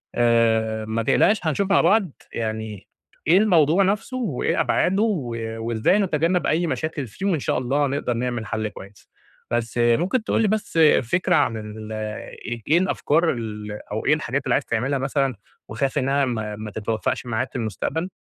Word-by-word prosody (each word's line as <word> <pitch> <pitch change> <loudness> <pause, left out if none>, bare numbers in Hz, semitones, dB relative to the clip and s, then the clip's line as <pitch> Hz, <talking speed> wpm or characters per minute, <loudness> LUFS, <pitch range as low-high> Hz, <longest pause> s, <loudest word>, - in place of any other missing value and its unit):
آآ 110 -2 +2
ما 110 +1 -2
تقلقش 210 - +3
هنشوف 180 +5 0
مع - - +5
بعض 200 -6 +3 0.2
يعني 110 -3 -4 0.4
إيه 170 +4 +6
الموضوع 180 -3 +4
نفسُه، 210 +6 -1
وإيه 205 - -1
أبعادُه، 195 +4 +2
و 150 - -1 0.2
وإزاي 115 - +1
نتجنب 175 -1 +1
أي 170 +2 +1
مشاكل 155 -3 -3
فيه، 155 - -7
وإن 180 -6 +1
شاء - - -1
الله 135 +3 +1
نقدر 135 -2 -1
نعمل 120 -1 -2
حَلّ 110 +1 -2
كويس، 100 -1 -13 0.4
بس 120 0 -1
ممكن 165 - +2
تقول 230 - +1
لي 220 - +3
بس 205 -5 -1 0.2
فكرة 175 +9 +1
عن 145 -7 +2
ال 110 0 -8 0.6
إي 120 -1 -5
إيه 155 - +4
الأفكار 170 -3 +1
ال 105 -3 -5 0.2
أو 110 +1 -3
إيه 145 - +5
الحاجات 140 -2 -1
اللي - - +1
عايز 135 - +1
تعملها 130 +4 -1
مثلًا، 135 -1 0 0.3
وخايف 130 +6 -1
إنها 140 +1 +2
ما 110 -4 -3
ما 105 0 -7
تتوفَّقش 110 +3 -2
معاك 120 +2 -2
في - - -25
المستقبل؟ 125 - -2
130 Hz, 170 wpm, -23 LUFS, 110-170 Hz, 0.6 s, إيه